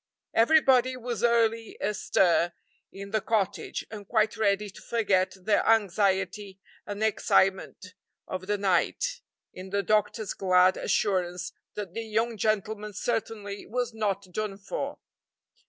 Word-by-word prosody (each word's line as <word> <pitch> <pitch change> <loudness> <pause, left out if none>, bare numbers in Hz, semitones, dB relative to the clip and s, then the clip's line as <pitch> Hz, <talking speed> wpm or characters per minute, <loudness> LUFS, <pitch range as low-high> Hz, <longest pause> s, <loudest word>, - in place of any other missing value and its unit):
Everybody 255 0 +4
was 240 -3 -4
early 230 -1 +2
astir 190 -4 +2 0.4
in 200 +1 -9
the 220 0 +1
cottage, 210 -3 -1
and 205 -3 -8
quite 220 -1 +2
ready 205 -1 +1
to - - -14
forget 200 -6 +1
the 205 +3 +2
anxiety 200 -2 +1 0.3
and 205 +1 -3
excitement 190 -3 +1 0.3
of 185 0 -5
the 205 0 +1
night 205 - 0 0.3
in 185 +1 -9
the 200 +1 0
doctor's 215 0 0
glad 185 -1 +4
assurance 180 -3 -1 0.2
that 200 -4 -5
the 230 - -3
young 225 +1 -1
gentleman 210 0 -1
certainly 210 -2 -3
was 245 0 -2
not 205 -3 -1
"done 210 -1 -3
for." 355 - -5
210 Hz, 125 wpm, -27 LUFS, 195-225 Hz, 0.4 s, Everybody